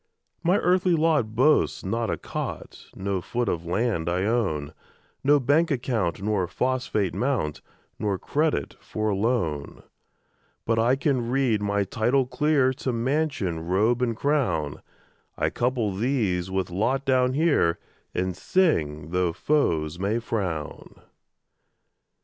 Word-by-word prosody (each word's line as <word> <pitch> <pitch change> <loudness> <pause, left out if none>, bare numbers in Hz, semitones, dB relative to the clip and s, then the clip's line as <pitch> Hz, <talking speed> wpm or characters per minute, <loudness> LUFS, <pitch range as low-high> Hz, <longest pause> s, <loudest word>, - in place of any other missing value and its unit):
My 180 +3 +3
earthly 180 0 +3
lot 155 -9 +1
boasts 140 -1 +3
not 115 +4 -1
a - - -1
cot, - - -6
No 95 -1 -2
foot 120 +6 -2
of 85 0 -2
land 90 -3 0
I 90 +2 0
own, 95 -10 0 0.5
No 145 +1 +5
bank 145 +6 +3
account 115 - -1
nor 100 -4 0
phosphate 125 -3 -1
mount, 120 - -1 0.4
Nor 100 -2 0
credit 150 - -1
for 110 0 -3
a 100 - +1
loan; 95 - -1 0.8
But 115 0 +1
I 120 +3 +3
can 135 -4 0
read 125 -5 +1
my 100 0 +1
title 120 +7 +1
clear 135 +1 +2
To 130 0 -3
mansion, 125 - -1
robe, 110 +7 +2
and 115 -3 0
crown; 90 - 0 0.6
I - - 0
couple 120 -5 0
these 100 -6 0
with 95 -1 -2
lot 125 +9 0
down 130 -1 +3
here, 145 - +2 0.4
And 90 0 -1
sing, 80 - 0
tho' 90 -2 +1
foes 85 - 0
may 100 +4 0
frown. 95 -10 -4
115 Hz, 130 wpm, -25 LUFS, 90-135 Hz, 0.8 s, No